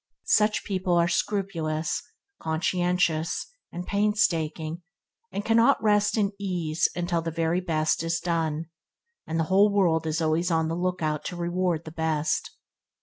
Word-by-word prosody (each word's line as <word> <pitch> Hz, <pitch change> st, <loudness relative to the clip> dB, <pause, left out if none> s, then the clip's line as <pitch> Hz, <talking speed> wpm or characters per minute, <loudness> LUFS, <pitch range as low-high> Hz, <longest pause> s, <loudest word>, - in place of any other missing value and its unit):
Such 210 Hz, 0 st, +3 dB
people 185 Hz, -3 st, 0 dB
are 170 Hz, 0 st, +4 dB
scrupulous, 170 Hz, -4 st, -1 dB, 0.4 s
conscientious, 170 Hz, 0 st, 0 dB, 0.3 s
and 175 Hz, +1 st, -6 dB
painstaking, 175 Hz, -6 st, 0 dB, 0.5 s
and 205 Hz, -, -4 dB
cannot 230 Hz, +5 st, +4 dB
rest 210 Hz, 0 st, +2 dB
in 200 Hz, -2 st, +2 dB
ease 175 Hz, -5 st, 0 dB
until 175 Hz, -1 st, -1 dB
the 165 Hz, -, -3 dB
very 165 Hz, +2 st, 0 dB
best 155 Hz, -4 st, 0 dB
is 165 Hz, 0 st, -1 dB
done, 165 Hz, -2 st, -1 dB, 0.6 s
and 165 Hz, +1 st, -1 dB
the -, -, +3 dB
whole 205 Hz, +2 st, +6 dB
world 170 Hz, -5 st, +2 dB
is 160 Hz, +1 st, -1 dB
always 165 Hz, +2 st, +1 dB
on 160 Hz, -1 st, +1 dB
the 165 Hz, -, -1 dB
lookout 170 Hz, -4 st, -1 dB
to 180 Hz, -, -4 dB
reward 175 Hz, -1 st, -1 dB
the 160 Hz, -, -7 dB
best. 160 Hz, -1 st, -1 dB
170 Hz, 145 wpm, -26 LUFS, 160-185 Hz, 0.6 s, whole